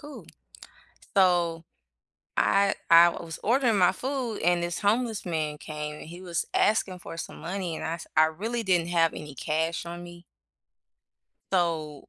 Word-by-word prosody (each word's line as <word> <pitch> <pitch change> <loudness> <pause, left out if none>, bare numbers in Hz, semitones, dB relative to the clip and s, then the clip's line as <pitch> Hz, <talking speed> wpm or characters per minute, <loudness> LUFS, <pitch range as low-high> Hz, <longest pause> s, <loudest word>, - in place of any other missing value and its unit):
Cool." 295 -1 -11 0.9
So, 175 -3 +3 0.7
I 200 0 +3 0.2
I 170 +1 +9
was 165 -1 -7
ordering 240 -1 +3
my 180 -1 +5
food, 255 +1 -3
and 175 0 +2
this 175 0 -2
homeless 220 0 +1
man 155 -3 -2
came 150 0 -6
and - - -10
he 170 +2 -9
was 175 -2 -2
asking 200 -3 +2
for 165 - -9
some - - -6
money, 180 -1 -4
and - - -5
I 160 - -2
s 170 - -10
I 155 - +8
really 220 +9 -3
didn't 175 -4 +2
have 165 -2 +3
any 150 -2 -8
cash 160 +5 -1
on 175 +1 -7
me 175 0 -12 1.3
so 160 -5 -1
175 Hz, 160 wpm, -27 LUFS, 165-200 Hz, 1.3 s, I